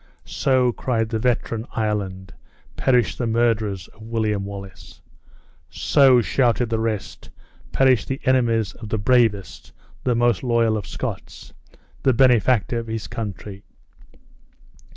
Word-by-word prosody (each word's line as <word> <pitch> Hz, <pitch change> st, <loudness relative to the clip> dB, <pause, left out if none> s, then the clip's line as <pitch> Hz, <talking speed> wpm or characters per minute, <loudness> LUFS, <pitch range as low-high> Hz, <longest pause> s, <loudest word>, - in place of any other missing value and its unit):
"So," 130 Hz, -2 st, +1 dB
cried 115 Hz, -2 st, -2 dB
the 110 Hz, -1 st, -2 dB
veteran 120 Hz, -1 st, -1 dB
Ireland, 100 Hz, -3 st, -3 dB, 0.4 s
"perish 125 Hz, -9 st, +2 dB
the 120 Hz, -, -2 dB
murderers 110 Hz, -5 st, 0 dB
of 110 Hz, -, -21 dB
William 110 Hz, -3 st, -2 dB
Wallace!" 100 Hz, -1 st, -10 dB, 0.7 s
"So," 130 Hz, -3 st, +4 dB
shouted 120 Hz, 0 st, +1 dB
the 115 Hz, -, 0 dB
rest, 110 Hz, -3 st, -4 dB, 0.4 s
"perish 130 Hz, -4 st, +3 dB
the 135 Hz, +1 st, -3 dB
enemies 115 Hz, -5 st, +1 dB
of 110 Hz, -3 st, -10 dB
the 110 Hz, -, -1 dB
bravest, 110 Hz, -3 st, +1 dB, 0.3 s
the 125 Hz, -2 st, +1 dB
most 120 Hz, -3 st, +2 dB
loyal 115 Hz, -3 st, +1 dB
of 105 Hz, -, -5 dB
Scots, -, -, -7 dB, 0.5 s
the 130 Hz, -, +3 dB
benefactor 125 Hz, -2 st, +3 dB
of 115 Hz, -, -7 dB
his 110 Hz, -1 st, -4 dB
country!" 100 Hz, -2 st, -7 dB
115 Hz, 125 wpm, -22 LUFS, 105-125 Hz, 0.7 s, So